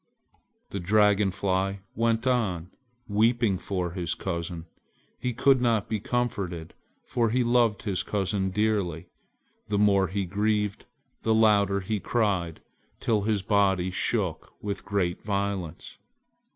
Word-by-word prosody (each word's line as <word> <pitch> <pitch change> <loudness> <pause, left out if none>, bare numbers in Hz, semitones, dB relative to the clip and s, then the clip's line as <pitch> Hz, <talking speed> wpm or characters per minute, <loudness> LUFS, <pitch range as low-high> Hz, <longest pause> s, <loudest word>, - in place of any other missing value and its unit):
The 100 - -3
Dragon 105 +1 +3
Fly 95 +1 -1
went 115 +1 +1
on, 100 -9 0 0.4
weeping 110 -1 +2
for 90 -3 -2
his 85 -2 -2
cousin. 85 -2 -4 0.5
He 125 -2 -2
would 135 -2 +6
not 115 -5 +1
be 110 - -1
comforted, 100 -8 -2 0.3
for 115 -2 0
he 125 +3 +2
loved 120 -3 +2
his 95 -4 -1
cousin 95 -1 -1
dearly. 100 -5 -1 0.6
The 105 - 0
more 100 -2 +4
he 95 +1 -2
grieved, 105 +1 -1 0.3
the 110 0 +2
louder 100 -3 +4
he 105 +2 -2
cried, 95 -8 -1 0.4
till 110 -3 +1
his 105 -1 0
body 95 -3 +2
shook 95 -2 -1
with 100 -1 -5
great 100 -4 -1
violence. 100 -5 -3
100 Hz, 125 wpm, -27 LUFS, 95-110 Hz, 0.6 s, would